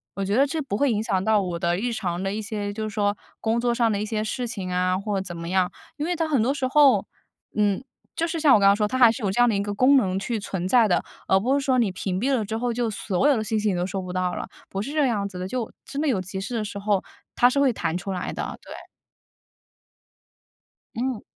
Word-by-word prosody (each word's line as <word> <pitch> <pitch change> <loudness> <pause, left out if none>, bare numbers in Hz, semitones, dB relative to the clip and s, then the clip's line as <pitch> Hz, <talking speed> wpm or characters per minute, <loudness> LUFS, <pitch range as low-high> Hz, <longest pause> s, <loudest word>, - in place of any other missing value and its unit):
我 195 - -2
觉 200 +3 0
得 275 +2 +5
这 315 +2 -2
不 260 -7 -3
会 280 -3 +2
影 210 -1 0
响 190 -3 0
到 215 -1 +3
我 175 -2 -3
的 175 +1 +1
日 235 +3 -2
常 180 -4 -2
的 195 +1 -1
一 220 - -3
些 205 -1 -4
就 220 +1 -4
是 - - -11
说， 205 0 +1 0.2
工 225 +1 0
作 240 0 +1
上 235 -1 +2
的 205 0 -1
一 - - -1
些 215 0 -2
事 245 +2 -3
情 190 -4 -5
啊， 185 0 +1
或 205 0 -2
者 - - -4
怎 175 -2 -7
么 170 +1 -6
样， 185 -1 +1 0.3
因 295 - -2
为 355 0 0
它 325 -1 -1
很 280 -7 +2
多 270 +4 +1
时 270 -3 -1
候， 285 0 +5 0.5
嗯， 205 0 +2 0.4
就 335 - +1
是 330 0 -3
像 300 -4 +6
我 - - +4
刚 195 - +5
刚 200 - +6
说 210 0 +1
它 255 - -2
还 240 -3 +8
是 235 -1 -6
有 195 - +1
这 220 - -2
样 245 - +6
的 220 - +2
一 200 - 0
个 205 0 -3
功 255 +6 +5
能 190 -5 +1
去 230 +2 -2
存 190 -3 -3
在 235 0 +5
的， 175 - +2 0.3
而 190 - +5
不 250 +7 +1
是 280 - -2
说 255 -2 +3
你 225 - +2
屏 185 0 -3
蔽 270 +4 +1
了 220 - 0
之 220 +2 -3
后 240 0 -1
就 240 -1 -1
所 210 +3 0
有 270 - +4
的 215 - -1
信 215 +1 -1
息 210 0 +1
你 - - -1
都 175 - 0
收 190 0 -3
不 180 -1 -6
到 180 -1 0
了， - - -5 0.2
不 195 - -3
是 275 +7 -5
这 300 -2 +2
样 205 -4 0
子 180 - -8
的， 185 - -3
就 240 0 -3
真 285 +1 -4
的 310 - 0
有 210 -7 +1
急 190 +1 -5
事 205 +5 -5
的 215 -2 -1
时 200 - -6
候， 200 -2 +1 0.3
它 245 - +5
是 280 - 0
会 270 -3 +4
弹 165 -4 -2
出 195 +2 -5
来 180 -1 -3
的， - - -5
对。 - - -10 2.2
嗯。 245 -1 -2
215 Hz, 305 characters per minute, -24 LUFS, 195-245 Hz, 2.2 s, 还